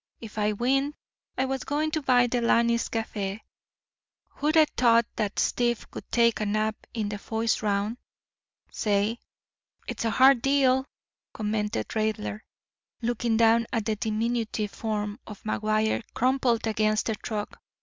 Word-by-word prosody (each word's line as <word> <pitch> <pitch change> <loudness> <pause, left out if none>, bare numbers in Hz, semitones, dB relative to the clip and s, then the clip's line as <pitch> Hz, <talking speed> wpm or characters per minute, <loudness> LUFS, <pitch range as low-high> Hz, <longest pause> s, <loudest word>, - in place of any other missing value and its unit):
If 220 -1 -8
I 210 0 +1
winned 270 +6 0 0.4
I 265 - +2
was 265 0 -2
goin' 305 +2 -1
to 315 - -1
buy 250 -3 +4
Delaney's 235 -1 +2
café. 210 -2 -3 1.0
Who'd 305 +3 +1
a 315 - +8
t'ought 235 -1 +4
dat 210 -2 -2
stiff 240 -1 +1
would - - -9
take 235 -1 +3
a 215 - -1
nap 215 +1 +1 0.2
in 215 -3 -1
de 205 0 -5
foist 225 +2 -1
round—say?" 210 0 -3 0.7
"It's - - -4
a 230 - +1
hard 260 +1 +5
deal," 265 -1 +3 0.5
commented 210 - -2
Raidler, 215 -1 -2 0.6
looking 235 -1 0
down 230 0 +4
at 225 -3 -1
the 220 -1 0
diminutive 220 0 -1
form 210 0 -3
of 210 -2 -10
McGuire 215 +1 0
crumpled 250 -2 +2
against 215 -1 +1
the 220 - 0
truck. 210 0 -5
225 Hz, 140 wpm, -27 LUFS, 215-245 Hz, 1.0 s, a